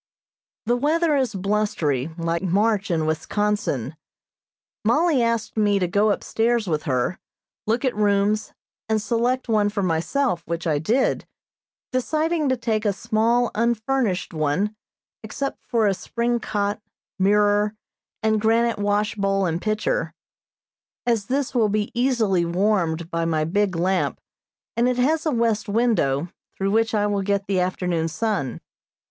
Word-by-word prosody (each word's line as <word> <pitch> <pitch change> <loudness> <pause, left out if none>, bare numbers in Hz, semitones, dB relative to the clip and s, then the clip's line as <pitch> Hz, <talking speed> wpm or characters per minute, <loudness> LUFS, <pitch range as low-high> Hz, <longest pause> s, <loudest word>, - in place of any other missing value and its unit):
The 240 +2 +2
weather 310 +3 +2
is 260 -6 0
blustery, 185 -9 0
like 170 0 -1
March 200 +3 +1
in 160 -3 +1
Wisconsin. 160 - -1 0.9
Mollie 285 +5 +3
asked 230 -2 -1
me 205 -2 +3
to 180 -2 +1
go 205 +4 +2
upstairs 230 +1 0
with 155 -3 0
her, 130 +4 0 0.5
look 235 +5 +1
at 255 - 0
rooms, 210 +1 +1 0.4
and 220 0 +2
select 245 +4 0
one 210 -3 +2
for 205 -1 -2
myself, 180 - 0
which 170 +1 -3
I 155 -3 +1
did, 230 - +1 0.6
deciding 310 +4 0
to 260 - +1
take 225 -2 -1
a 205 -2 +1
small 230 +4 +1
unfurnished 235 -3 0
one 160 +8 0 0.5
(except 275 +6 -4
for 230 -3 +2
a 200 - +3
spring 235 +5 -1
cot, 205 -1 -2 0.4
mirror, 205 +2 +3 0.5
and 220 -1 +2
granite 230 +1 +2
wash 205 +1 +1
bowl 195 -1 0
and 170 0 -1
pitcher), 220 - -1 0.9
as 230 -4 +1
this 275 0 -1
will 225 -4 +3
be 210 0 -1
easily 235 -8 +2
warmed 170 -2 0
by 165 0 -1
my 160 -2 +1
big 195 +2 0
lamp, 180 +2 0 0.6
and 240 +2 +2
it 250 - -1
has 310 +6 +1
a - - +2
west 230 -3 0
window, 200 - +1 0.3
through 195 0 0
which 225 +1 +2
I 205 -1 +2
will 205 -1 0
get 200 0 0
the 195 -2 0
afternoon 180 -2 0
sun. 190 - -2
210 Hz, 145 wpm, -23 LUFS, 185-235 Hz, 0.9 s, Mollie